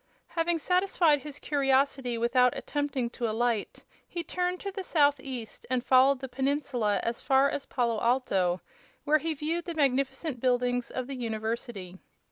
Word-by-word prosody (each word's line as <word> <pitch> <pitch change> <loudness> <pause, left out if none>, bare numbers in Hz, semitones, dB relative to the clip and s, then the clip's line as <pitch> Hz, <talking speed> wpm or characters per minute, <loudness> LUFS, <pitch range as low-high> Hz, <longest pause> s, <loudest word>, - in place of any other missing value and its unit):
Having 335 0 0
satisfied 350 -3 +2
his 295 0 -8
curiosity 270 -3 +1
without 245 +2 +3
attempting 285 -4 -2
to 235 -2 -2
alight, 225 -1 -1 0.2
he 345 -1 -4
turned 360 +2 -2
to 400 - -4
the 390 0 -5
southeast 280 - 0
and 255 -1 0
followed 265 +1 +5
the 265 - -4
peninsula 260 -5 0
as 235 0 -2
far 270 +1 +3
as 280 - -4
Palo 235 -4 0
Alto, 195 -8 +1 0.4
where 305 +1 +3
he 320 +1 -2
viewed 325 +4 -2
the 340 -2 -5
magnificent 270 0 0
buildings 245 0 +1
of 255 - -4
the 275 - -6
university. 220 -5 -4
265 Hz, 150 wpm, -28 LUFS, 240-295 Hz, 0.4 s, followed